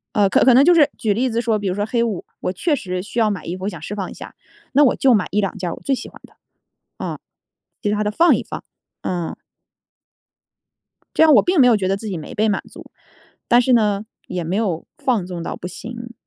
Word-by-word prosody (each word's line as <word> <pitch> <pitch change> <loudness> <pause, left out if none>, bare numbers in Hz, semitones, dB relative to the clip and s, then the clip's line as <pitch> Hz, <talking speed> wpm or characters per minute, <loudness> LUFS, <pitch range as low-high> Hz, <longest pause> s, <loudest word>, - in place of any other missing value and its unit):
呃， 205 -2 +4
可 - - +3
可 255 - +6
能 265 +3 +6
就 350 - +7
是 305 -4 +5
举 215 -2 +1
例 250 +5 0
子 230 0 0
说 225 -2 0
比 205 - -3
如 185 - -1
说 205 +1 -1
黑 235 +1 0
五， 215 -6 -3
我 - - -2
确 300 - 0
实 185 -7 -4
需 220 +4 -4
要 220 -2 +3
买 195 -6 -4
衣 175 - -4
服， 185 - -6
我 - - 0
想 - - -9
释 - - -6
放 195 -3 -4
一 - - -9
下。 - - -10 0.4
那 285 +2 +6
我 265 - +4
就 265 -2 +4
买 205 -5 +2
1-2 200 -1 -1
件 180 -2 -3
儿 - - -4
我 - - -11
最 275 - 0
喜 260 - -4
欢 - - -16
的， - - -23 0.6
啊， - - -5 0.6
其 205 - 0
它 210 0 0
的 210 - -1
放 340 +10 +5
一 - - -3
放， - - -7 0.4
啊。 175 -3 -3 1.8
这 - - +5
样 315 -1 +7
我 - - +7
并 360 -2 +2
没 255 - +7
有 240 - +5
觉 185 -2 -1
得 195 - +1
自 220 - -7
己 190 -4 -3
没 155 - -8
被 215 +1 +2
满 205 - 0
足， - - -13 0.6
但 240 0 +5
是 255 +1 +2
呢， 210 -3 +2 0.2
也 180 -1 -3
没 170 +4 -2
有 195 -7 -1
放 235 -8 0
纵 180 -2 -6
到 - - -4
不 180 - -7
行。 235 +4 -8
210 Hz, 270 characters per minute, -20 LUFS, 190-245 Hz, 1.8 s, 就